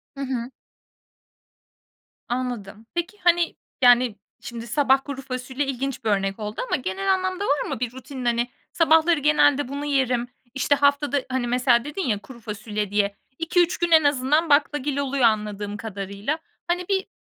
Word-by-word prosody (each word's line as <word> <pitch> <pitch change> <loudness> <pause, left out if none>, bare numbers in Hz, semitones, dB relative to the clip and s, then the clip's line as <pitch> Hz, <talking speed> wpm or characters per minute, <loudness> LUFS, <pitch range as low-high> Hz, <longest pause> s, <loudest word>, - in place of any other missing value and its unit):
Hı 275 - -6
hı. 255 -2 -3 1.8
Anladım. 240 -4 -4
Peki, 345 +4 -3
hani, 345 -1 +3 0.3
yani 245 -2 +5 0.3
şimdi 235 -1 -7
sabah 270 +1 +3
kuru 275 -1 -6
fasulye 260 +1 -3
ilginç 270 -1 -3
bir 220 - 0
örnek 195 0 0
oldu 210 0 -4
ama - - +1
genel 285 - 0
anlamda 375 +1 -1
var 285 -5 0
mı - - -3
bir 245 -1 -2
rutinin 260 0 -8
hani 240 +1 +1 0.2
sabahları 325 0 +4
genelde 290 -1 +3
bunu 285 +2 -4
yerim, 255 -4 +1 0.3
işte 270 +1 +2
haftada 285 0 +2
hani, 255 -1 -1
mesela 245 -1 +3
dedin 295 +8 -4
ya 210 -4 +1
kuru 240 +3 -13
fasulye 210 -2 -4
diye, 205 -1 +1 0.2
2-3 345 +1 +2
gün 345 -1 -1
en 320 -1 +7
azından 290 +3 +2
baklagil 290 -1 +2
oluyor 280 -1 0
anladığım 210 -2 0
kadarıyla. 200 +5 -4 0.3
Hani 350 +1 -1
bir 385 -1 0
260 Hz, 155 wpm, -24 LUFS, 235-295 Hz, 1.8 s, en